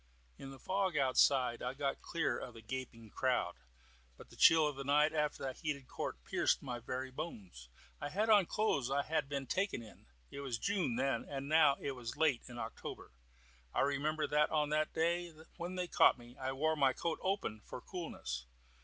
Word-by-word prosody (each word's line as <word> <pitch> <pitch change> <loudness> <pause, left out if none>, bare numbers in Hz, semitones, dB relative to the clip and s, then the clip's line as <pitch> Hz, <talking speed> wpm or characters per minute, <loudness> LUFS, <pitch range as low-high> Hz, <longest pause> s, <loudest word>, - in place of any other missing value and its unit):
In 135 - -7
the 135 - -10
fog 190 0 0
outside 130 -2 +3
I 125 +2 -3
got 140 -1 -2
clear 160 -7 -1
of 120 - -7
the 115 - -11
gaping 115 -2 -6
crowd, - - +1 0.6
but - - -14
the - - -13
chill 160 -1 +7
of 145 - -3
the 135 - -5
night 150 +3 +3
after 150 -1 -1
that 130 -1 -3
heated 145 -5 -3
court - - -5
pierced - - +1
my 125 -3 -4
very 130 +2 -4
bones. 100 - -7 0.3
I 145 - -3
had 210 +8 0
on 210 -4 +6
the - - -25
clothes 140 - +1
I 140 +1 +1
had 155 -2 -1
been 140 -2 -2
taken 185 - -1
in. 110 - -15 0.2
It 140 - -7
was 135 -4 -3
June 185 - 0
then, 135 +2 0
and 140 -1 -4
now 150 -2 +5
it 140 - -2
was 120 -3 -6
late 150 -6 +3
in 120 - -9
October. 115 - -7 0.6
I - - +3
remember 145 +3 +1
that 150 +1 +3
on 150 -2 +1
the 155 0 +2
day 170 +1 0 0.2
when 175 +2 -4
they 180 -1 -2
caught - - +5
me 120 0 -14
I 130 0 -3
wore 155 +4 +1
my 135 -3 +3
coat 165 +3 -2
open 185 - -1
for - - -7
coolness. 140 - -5
140 Hz, 200 wpm, -35 LUFS, 130-160 Hz, 0.6 s, chill